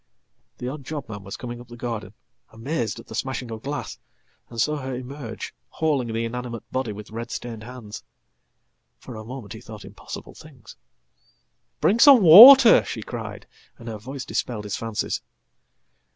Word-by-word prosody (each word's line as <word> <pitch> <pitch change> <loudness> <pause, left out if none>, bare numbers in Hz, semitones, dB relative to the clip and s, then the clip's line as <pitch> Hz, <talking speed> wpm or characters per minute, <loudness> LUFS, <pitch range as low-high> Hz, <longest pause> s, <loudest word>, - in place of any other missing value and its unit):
The 125 - -6
odd 140 +2 -6
job 145 0 -6
man 105 -2 -8
was 100 - -8
coming 120 -1 -7
up 120 - -14
the 120 0 -12
garden, 110 -4 -5 0.3
amazed 115 -1 -4
at 115 - -12
the - - -11
smashing 125 0 -4
of 110 -1 -7
glass, 145 +3 -5 0.5
and 115 - -8
saw 150 +5 +1
her 130 -2 -5
emerge, 125 -2 -7 0.2
hauling 140 -7 -1
the 115 +1 -2
inanimate 120 0 -6
body 130 -4 -2
with 105 +1 -10
red 115 +2 -6
stained 115 -3 -6
hands. 115 -2 -9 0.9
Fora 110 -1 -10
moment 115 -3 -8
he 110 - -10
thought 110 -3 -11
impossible - - -10
things."Bring - - -7
some 270 -5 +8
water!" 235 - +10
she - - -6
cried, - - -7 0.3
and 115 - -12
her 110 -2 -6
voice 130 +4 -7
dispelled 115 -4 -3
his 105 -2 -4
fancies. 115 -2 -3
120 Hz, 160 wpm, -24 LUFS, 110-135 Hz, 0.9 s, water